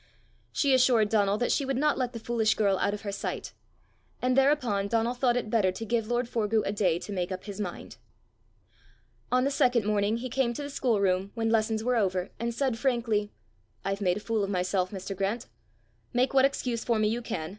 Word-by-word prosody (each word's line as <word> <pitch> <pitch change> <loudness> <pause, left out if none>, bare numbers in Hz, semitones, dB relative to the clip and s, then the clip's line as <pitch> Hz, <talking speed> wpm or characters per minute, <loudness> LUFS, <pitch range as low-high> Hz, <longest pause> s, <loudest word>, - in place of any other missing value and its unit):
She 280 -2 +2
assured 245 -5 +4
Donal 205 -2 +2
that 245 - 0
she 285 - +1
would 270 -1 -1
not 300 +2 +2
let 250 -2 -1
the 230 - -7
foolish 225 -1 +1
girl 200 -3 +2
out 205 - +1
of 205 - -9
her 200 - -3
sight; 195 - -5 0.7
and 255 0 +1
thereupon 260 -8 +2
Donal 230 +2 +1
thought 245 -1 +1
it 225 -3 -3
better 205 -5 +3
to 225 +5 -6
give 225 -1 0
lord 240 +1 0
Forgue 220 -2 0
a - - 0
day 190 -5 +1
to 195 - -8
make 180 -2 -2
up 185 0 -5
his 205 0 -6
mind. 180 -4 -6 1.3
On 255 0 +3
the 280 - +1
second 245 -5 +2
morning 210 +1 +1
he 250 +2 -4
came 250 -1 0
to 290 - -4
the 285 - -6
schoolroom 200 -8 +1
when 225 -1 0
lessons 220 -1 +1
were 250 0 +1
over, 185 -3 0
and 235 +1 -1
said 240 -1 -1
frankly, 230 -5 0 0.5
"I've 195 +1 -2
made 180 -1 +2
a - - -6
fool 220 -1 -1
of 195 - -2
myself, 185 -1 0
Mr. 195 0 -6
Grant! 200 +6 -2 0.7
Make 255 +2 +2
what 265 0 +6
excuse 250 -4 -1
for 235 -2 +1
me 215 0 +2
you 230 +3 -1
can. 160 -9 -4
225 Hz, 215 wpm, -28 LUFS, 200-245 Hz, 1.3 s, what